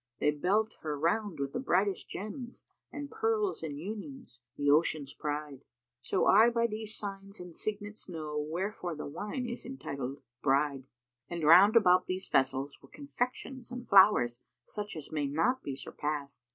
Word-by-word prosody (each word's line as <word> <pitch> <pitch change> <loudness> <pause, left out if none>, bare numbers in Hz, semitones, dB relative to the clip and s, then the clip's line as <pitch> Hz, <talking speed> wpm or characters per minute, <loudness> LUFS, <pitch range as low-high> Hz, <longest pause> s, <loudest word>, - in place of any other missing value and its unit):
They 150 - +3
belt 200 +9 0
her 150 -2 -3
round 170 +2 0
with 140 0 -2
the - - -1
brightest 195 -5 +1
gems, 235 +5 -7
* - - -57
And 290 -1 -6
pearls 445 -3 0
and 150 -3 -4
unions, 215 - -7 0.2
the 145 - -1
Ocean's 150 -2 +2
pride; 145 -2 -4 0.4
So - - +1
I 220 +4 +7
by 235 0 +1
these 220 -1 -4
signs 200 0 -6
and 180 -2 -9
signets 210 -1 -5
know 155 -3 -5
* - - +2
Wherefore 180 -1 -3
the 150 - -6
Wine 205 - -4
is 240 0 -5
entitled 140 - -6 0.2
'Bride.'[FN#306]" 135 -1 +1 0.4
And 170 -2 -4
round 185 +8 +8
about 185 -4 +5
these 185 +1 -2
vessels 135 +1 +1
were - - -17
confections 260 -2 -4
and 245 -1 -7
flowers, 190 - +6 0.3
such 210 -2 -5
as 155 -3 -8
may 150 -2 0
not 165 - +1
be 140 - -4
surpassed. 140 -2 -5
185 Hz, 165 wpm, -31 LUFS, 150-220 Hz, 0.4 s, round